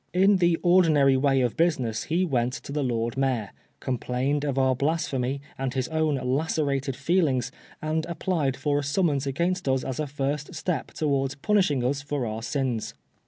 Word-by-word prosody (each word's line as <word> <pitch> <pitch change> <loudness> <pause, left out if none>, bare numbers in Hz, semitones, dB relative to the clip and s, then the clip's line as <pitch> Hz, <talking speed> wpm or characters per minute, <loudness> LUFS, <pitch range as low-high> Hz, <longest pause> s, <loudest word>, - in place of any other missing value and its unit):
In 195 +2 +5
the 175 -2 +3
ordinary 160 -7 +5
way 135 0 +3
of 125 -2 0
business 130 -10 0
he 175 +4 +1
went 125 -6 0
to 140 - -7
the 150 +1 -1
Lord 115 -1 -1
Mayor, 130 -7 0 0.3
complained 130 +3 -1
of 140 -2 -1
our 130 -1 +3
blasphemy 140 -2 -1 0.2
and 135 -1 -2
his 130 -2 0
own 155 -2 +1
lacerated 140 0 -1
feelings, 135 -4 +1 0.3
and 155 +1 -1
applied 160 -5 -1
for 145 -1 0
a - - -3
summons 145 -2 +1
against 170 +3 -1
us 130 -1 +1
as 130 0 -4
a 155 - -1
first 140 +1 -3
step 180 -4 -2
towards 140 -3 -1
punishing 150 -5 +1
us 135 +3 0
for 145 -3 -3
our 110 0 -4
sins. 125 -2 -2
140 Hz, 170 wpm, -26 LUFS, 130-160 Hz, 0.3 s, In